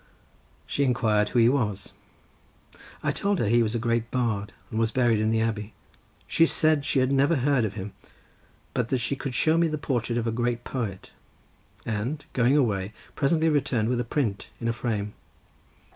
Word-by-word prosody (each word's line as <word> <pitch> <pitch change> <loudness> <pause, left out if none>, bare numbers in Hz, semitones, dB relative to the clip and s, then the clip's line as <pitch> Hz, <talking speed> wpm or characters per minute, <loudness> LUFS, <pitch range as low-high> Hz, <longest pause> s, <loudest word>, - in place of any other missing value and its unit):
She 140 - 0
inquired 110 -5 +2
who - - -2
he 115 -1 +6
was. 110 -8 -1 1.1
I - - +1
told 200 0 0
her 120 - 0
he 120 +3 +4
was 110 0 0
a - - +2
great 115 0 0
bard, 115 -5 -1 0.2
and 110 - -2
was 115 0 +2
buried 120 -2 +2
in 110 0 +1
the 110 0 +2
abbey. 110 -1 -2 0.5
She 165 - +3
said 155 -3 +2
she 145 - 0
had 130 0 +3
never 140 +4 +3
heard 135 -3 +2
of 100 -1 -4
him, 100 -1 -6 0.8
but 120 -2 -1
that 130 - +2
she 135 +3 -1
could 135 -2 -5
show 160 +5 +3
me 170 - +4
the 155 -1 -2
portrait 120 -4 -1
of 115 - -1
a 115 - 0
great 120 +1 -1
poet, 110 -8 -5 0.7
and 115 +8 -3
going 125 +3 +3
away, 105 -6 0 0.2
presently 160 +3 +2
returned 130 -7 +1
with 125 -1 0
a - - 0
print 115 -6 -2
in 115 - -3
a 115 - +1
frame. 105 -3 -3
120 Hz, 190 wpm, -26 LUFS, 110-135 Hz, 1.1 s, he